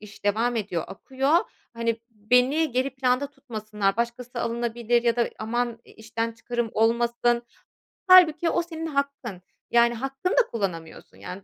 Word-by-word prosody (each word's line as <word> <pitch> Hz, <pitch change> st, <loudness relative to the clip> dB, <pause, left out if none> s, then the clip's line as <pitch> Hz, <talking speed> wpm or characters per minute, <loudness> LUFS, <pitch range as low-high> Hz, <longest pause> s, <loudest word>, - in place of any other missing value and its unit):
iş 210 Hz, -1 st, -14 dB
devam 225 Hz, +4 st, +1 dB
ediyor, 195 Hz, -6 st, -2 dB
akıyor, 270 Hz, -, 0 dB, 0.4 s
hani, 230 Hz, -1 st, -1 dB
beni 250 Hz, +8 st, +2 dB
geri 260 Hz, +3 st, 0 dB
planda 260 Hz, +1 st, +1 dB
tutmasınlar, 215 Hz, -7 st, -3 dB
başkası 235 Hz, +1 st, -3 dB
alınabilir 235 Hz, 0 st, 0 dB
ya 235 Hz, -1 st, +2 dB
da 235 Hz, -, +1 dB
aman 235 Hz, +1 st, -2 dB
i -, -, -18 dB
işten 225 Hz, +1 st, -4 dB
çıkarım 235 Hz, 0 st, -3 dB
olmasın. 235 Hz, +1 st, +2 dB, 0.7 s
Hâlbuki 345 Hz, -3 st, +7 dB
o -, -, +1 dB
senin 325 Hz, -1 st, -6 dB
hakkın. 280 Hz, -, -3 dB, 0.3 s
Yani, 235 Hz, 0 st, +5 dB
hakkını 270 Hz, +9 st, -3 dB
da -, -, +8 dB
kullanamıyorsun, 180 Hz, -8 st, -5 dB
yani, 185 Hz, +2 st, -8 dB
235 Hz, 140 wpm, -25 LUFS, 225-265 Hz, 0.7 s, da